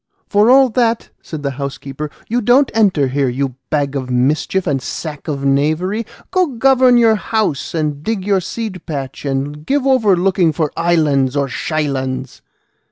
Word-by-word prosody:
"For 205 +3 +3
all 265 0 +6
that," 230 0 0
said 155 -3 -7
the 140 - -1
housekeeper, 140 +1 -5 0.2
"you 240 +2 0
don't 250 +5 +4
enter 190 -11 +3
here, 135 0 0
you 130 +1 -2 0.2
bag 145 -2 -1
of 130 -2 -3
mischief 145 +9 0
and 140 -5 0
sack 150 +2 -6
of 140 -3 -3
knavery; 155 +10 0 0.2
go 370 -2 +2
govern 255 -1 +4
your 230 -2 +5
house 205 -9 -2
and 150 -3 -2
dig 200 +2 -3
your 200 -2 +2
seed 200 -2 -5
patch, 140 -4 -5
and 140 +2 -3
give 275 - 0
over 225 -8 +3
looking 180 -3 +2
for 155 -3 -1
islands 150 -6 +1
or 140 -1 +1
shylands." 135 -3 -3
155 Hz, 165 wpm, -17 LUFS, 140-220 Hz, 0.2 s, all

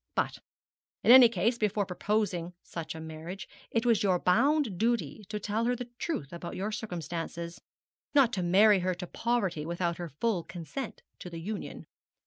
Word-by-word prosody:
But - - 0 0.6
in - - +6
any 250 -2 +10
case, 230 +4 0
before 210 -1 +1
proposing 180 -2 -1
such 165 -1 -6
a - - -6
marriage, 160 +4 -7 0.2
it 230 +1 0
was 230 -4 +4
your 190 -4 +3
bounden 245 - +3
duty 225 0 0
to 210 0 -3
tell 215 +3 -1
her 245 +1 +2
the 245 0 -7
truth 155 - -3
about 170 0 -6
your 205 +3 -2
circumstances, 170 -4 -5 0.5
not 265 -5 +5
to 185 - 0
marry 195 +4 +6
her 185 0 0
to 180 +1 -6
poverty 195 -7 -1
without 170 +1 -1
her 175 -1 -5
full 185 - 0
consent 185 - -6 0.2
to 180 - -7
the 170 -1 -7
union.' 200 +5 -5
195 Hz, 170 wpm, -30 LUFS, 175-230 Hz, 0.6 s, any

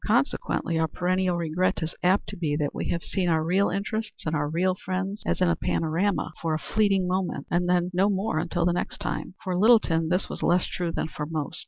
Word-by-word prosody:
Consequently 170 - +1
our 160 - +2
perennial 180 +2 0
regret 170 +1 0
is 160 - -3
apt 185 +3 +2
to - - -6
be 155 -4 -1
that 150 -1 -1
we - - -3
have 170 - -1
seen 185 -3 -1
our 160 -1 +2
real 185 +5 +2
interests 215 +3 -3
and 155 0 0
our 145 -1 0
real 180 +4 +1
friends 190 +2 -3
as - - 0
in 180 - +4
a 170 - +3
panorama, 165 +3 0
for 160 -2 0
a 155 - -7
fleeting 195 -3 +3
moment, 185 0 -1
and 175 +1 +1
then 180 0 +2
no 190 +3 +3
more 195 -4 0
until 170 +1 -1
the 175 - +3
next 175 - -3
time. - - -4
For 185 -1 -2
Littleton 180 -6 +4
this 180 +2 +1
was - - -6
less 175 +1 +3
true 175 -2 -3
than - - -2
for 150 -1 -5
most. 155 -2 -3
180 Hz, 225 wpm, -26 LUFS, 165-190 Hz, -, in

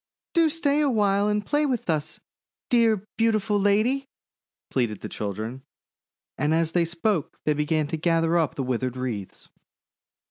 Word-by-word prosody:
"Do 330 -2 +4
stay 300 -2 +1
awhile 205 -7 +2
and 210 0 0
play 295 +1 +1
with 250 -5 -2
us, 155 -3 -1 0.5
dear, 225 -4 +3
beau 225 0 +4
tiful 210 -1 +1
lady!" 220 +7 +2 0.6
pleaded 115 -6 -1
the - - -6
children; 110 +5 -5 0.8
and 150 +2 +2
as 165 -1 +1
they 170 -1 +2
spoke 170 +1 -1
they 150 - +3
began 150 +1 0
to 160 - -2
gather 165 +1 +2
up 165 -4 +1
the 135 - -2
withered 130 0 -2
wreaths. 115 -7 -5
170 Hz, 150 wpm, -25 LUFS, 145-220 Hz, 0.8 s, Do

